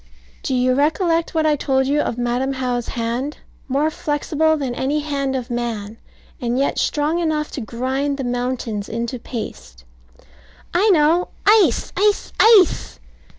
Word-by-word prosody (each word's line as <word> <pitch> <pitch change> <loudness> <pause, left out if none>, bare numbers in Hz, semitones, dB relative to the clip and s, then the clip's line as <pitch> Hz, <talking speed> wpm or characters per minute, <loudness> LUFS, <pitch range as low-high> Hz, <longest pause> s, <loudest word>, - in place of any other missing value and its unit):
Do 265 - -1
you 255 0 +2
recollect 330 +4 +1
what 315 -1 +2
I 305 -1 +3
told 265 -2 +1
you 285 +2 +1
of 235 - -3
Madam 245 +2 -1
How's 250 -2 -2
hand, 240 +5 -3 0.3
more 285 +4 +1
flexible 310 +1 0
than 270 -4 -3
any 280 +5 -1
hand 280 -2 -2
of 250 -1 -4
man, 225 -3 -4 0.4
and 240 0 -1
yet 275 - 0
strong 305 +3 0
enough 310 -3 -1
to 275 - -5
grind 260 +5 -2
the 270 - -3
mountains 245 -4 -3
into 235 +2 -3
paste? 215 - -8 0.9
I 385 +5 +3
know. 335 0 +4 0.2
Ice! 405 - +4
ice! 415 +1 +1
ice! 430 -7 +5
270 Hz, 150 wpm, -20 LUFS, 245-310 Hz, 0.9 s, ice